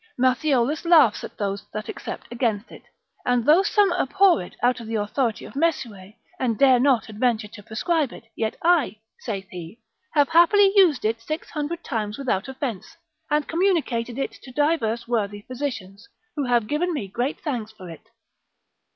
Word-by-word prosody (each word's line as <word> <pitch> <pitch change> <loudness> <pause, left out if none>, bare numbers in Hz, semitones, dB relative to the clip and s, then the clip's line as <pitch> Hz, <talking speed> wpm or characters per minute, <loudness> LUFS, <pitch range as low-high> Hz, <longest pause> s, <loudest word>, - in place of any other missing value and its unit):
Matthiolus 260 +2 +1
laughs 330 -10 +5
at - - -9
those 200 -1 -3
that 215 0 -5
except - - -7
against 230 -3 -1
it, - - -13 0.4
and 245 -2 +1
though 315 +5 +6
some 400 -1 +3
abhor 365 - +3
it 175 - -10
out 245 0 +3
of 230 - -9
the 225 - -3
authority 220 +2 -1
of - - -11
Mesue, 235 - -2 0.3
and 235 -4 0
dare 265 -3 +5
not 255 -3 +3
adventure 220 0 0
to 205 - -12
prescribe 280 - -1
it, - - -11
yet 220 -1 -2
I 330 -9 +3 0.2
(saith 195 -5 -5
he) 175 +4 -9 0.4
have 290 -2 +4
happily 390 +4 +5
used 340 - +4
it 225 +1 0
six 310 +7 -5
hundred 315 +3 -4
times 215 -4 -3
without 255 -7 -1
offence, 255 -7 -5 0.3
and 300 -1 +1
communicated 305 -10 0
it 275 - -2
to 260 - -12
divers 245 -6 0
worthy 205 -3 -2
physicians, 230 -6 -6 0.3
who 290 -3 -1
have 240 -3 +2
given 320 +7 -1
me 215 -9 -3
great 240 +8 -2
thanks 240 -8 -3
for 190 -4 -12
it. 170 +7 -12
245 Hz, 170 wpm, -24 LUFS, 220-300 Hz, 0.4 s, though